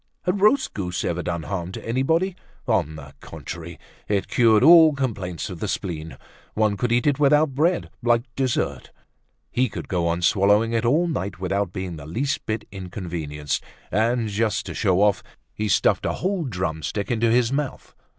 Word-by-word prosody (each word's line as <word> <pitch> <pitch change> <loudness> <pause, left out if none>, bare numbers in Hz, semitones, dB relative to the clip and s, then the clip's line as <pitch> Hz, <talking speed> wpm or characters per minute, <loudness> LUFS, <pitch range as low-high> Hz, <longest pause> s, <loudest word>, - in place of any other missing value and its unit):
Had 185 +2 -1
roast 265 +6 +3
goose 90 -3 -3
ever 85 0 -1
done 85 -1 -3
harm 90 0 -4
to - - -8
anybody? 160 +10 +1 0.3
On 90 - +1
the 70 -2 -11
contrary, 85 0 -8 0.3
it 100 -2 0
cured 115 -2 +4
all 160 -1 +8
complaints 100 -11 -3
of 90 - -7
the 105 - -2
spleen. 80 -5 -4 0.4
One 105 -1 +2
could 120 +4 -1
eat 120 0 +2
it 145 -2 +2
without 150 0 +4
bread, 165 +6 +1
like 120 -1 +2
dessert. 130 -3 -1 0.6
He 125 0 +1
could - - -7
go 85 -2 0
on 85 +1 -1
swallowing 105 +5 +3
it 115 0 0
all 155 +9 +3
night 100 - -3
without 95 0 -1
being 90 -2 -5
the 70 -1 -10
least 135 - -2
bit 110 0 -3
inconvenienced; 85 -7 -4 0.3
and, 115 +2 +1
just 105 -1 -1
to 90 - -6
show 95 +2 +2
off, 105 -2 +3 0.3
he 105 - -2
stuffed 95 - +2
a - - 0
whole 185 -2 -1
drum 90 - -3
stick 100 +7 -3
into 115 0 +2
his 120 +2 +2
mouth. 145 -1 -3
105 Hz, 180 wpm, -23 LUFS, 90-130 Hz, 0.6 s, all